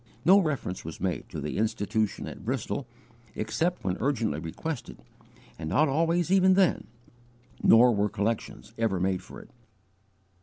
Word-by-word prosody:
No 190 Hz, +4 st, +7 dB
reference 145 Hz, -, -2 dB
was 80 Hz, 0 st, -8 dB
made 90 Hz, -6 st, -3 dB
to -, -, -6 dB
the 75 Hz, +6 st, -3 dB
Institution 110 Hz, 0 st, -1 dB
at -, -, -9 dB
Bristol, 125 Hz, +2 st, -3 dB, 0.5 s
except 160 Hz, +11 st, -1 dB
when 90 Hz, -1 st, -1 dB
urgently 115 Hz, -, 0 dB
requested, 120 Hz, -, -6 dB, 0.6 s
and 80 Hz, -1 st, -4 dB
not 150 Hz, -, +3 dB
always 165 Hz, +4 st, +1 dB
even 190 Hz, -1 st, +5 dB
then; 190 Hz, -3 st, +2 dB, 0.7 s
nor 120 Hz, +2 st, +6 dB
were 105 Hz, 0 st, +1 dB
collections 105 Hz, +1 st, -3 dB
ever 110 Hz, -5 st, +1 dB
made 95 Hz, 0 st, 0 dB
for -, -, -11 dB
it. -, -, -18 dB
115 Hz, 145 wpm, -27 LUFS, 95-160 Hz, 0.7 s, No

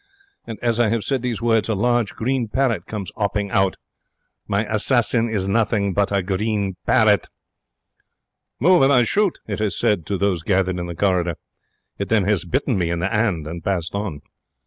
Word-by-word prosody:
And 115 Hz, -2 st, -6 dB
as 120 Hz, -1 st, +1 dB
I 120 Hz, -3 st, +3 dB
have 115 Hz, -1 st, -1 dB
said 135 Hz, -3 st, -1 dB
these 120 Hz, -2 st, -3 dB
words, 115 Hz, -2 st, +2 dB
a 110 Hz, -, +1 dB
large 120 Hz, 0 st, +1 dB
green 125 Hz, 0 st, -1 dB
parrot 115 Hz, -6 st, 0 dB
comes 105 Hz, -4 st, -5 dB
'opping 100 Hz, -1 st, -2 dB
out. 95 Hz, -2 st, +2 dB, 0.7 s
My 100 Hz, +2 st, 0 dB
assassin 115 Hz, +2 st, +1 dB
is 100 Hz, -4 st, -1 dB
nothing 100 Hz, -1 st, +1 dB
but 100 Hz, +1 st, +1 dB
a 100 Hz, -2 st, +1 dB
green 100 Hz, 0 st, -1 dB
parrot. 110 Hz, -4 st, +4 dB, 1.3 s
'Move 180 Hz, +3 st, +5 dB
and 135 Hz, +1 st, +5 dB
I 125 Hz, -3 st, +5 dB
shoot!' 200 Hz, -, +1 dB
it 100 Hz, -2 st, -4 dB
has 105 Hz, -2 st, -1 dB
said 95 Hz, -7 st, 0 dB
to 100 Hz, -, -1 dB
those 95 Hz, -3 st, 0 dB
gathered 95 Hz, 0 st, 0 dB
in 85 Hz, -, -4 dB
the 85 Hz, -, -6 dB
corridor. 90 Hz, -2 st, +1 dB, 0.6 s
It 100 Hz, -, -3 dB
then 110 Hz, -3 st, +3 dB
has 100 Hz, -3 st, 0 dB
bitten 125 Hz, +2 st, 0 dB
me 85 Hz, -2 st, 0 dB
in 85 Hz, -, -1 dB
the 95 Hz, +6 st, -2 dB
'and 105 Hz, -8 st, 0 dB
and 80 Hz, +1 st, -7 dB
passed 90 Hz, -3 st, -2 dB
on. 100 Hz, -8 st, -4 dB
105 Hz, 190 wpm, -21 LUFS, 95-115 Hz, 1.3 s, Move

